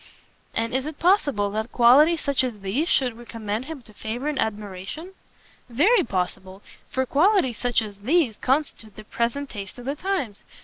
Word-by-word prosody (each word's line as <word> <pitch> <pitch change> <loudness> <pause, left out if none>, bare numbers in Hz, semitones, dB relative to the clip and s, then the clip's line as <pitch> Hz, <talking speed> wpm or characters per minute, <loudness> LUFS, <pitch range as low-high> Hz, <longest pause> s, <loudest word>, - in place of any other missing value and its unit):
"And 230 +2 -1
is 260 +2 -1
it 310 -1 -6
possible 285 - +2
that 220 +3 -3
qualities 290 +7 +6
such 280 -2 +1
as 235 -5 -4
these 245 - -1
should 250 -4 +2
recommend 230 -1 -5
him 300 -4 -8
to 215 - -15
favour 225 +7 -4
and 300 -3 -1
admiration?" 210 - -4 0.6
"Very 360 - +4
possible, 190 -1 -4 0.3
for 260 0 0
qualities 300 - +3
such 245 -2 +2
as 205 -2 -9
these 255 0 +2
constitute 260 -6 -1
the 215 - -10
present 240 +6 -2
taste 200 0 -7
of 245 - -10
the 275 - -1
times. 300 - -3
245 Hz, 170 wpm, -24 LUFS, 215-290 Hz, 0.6 s, qualities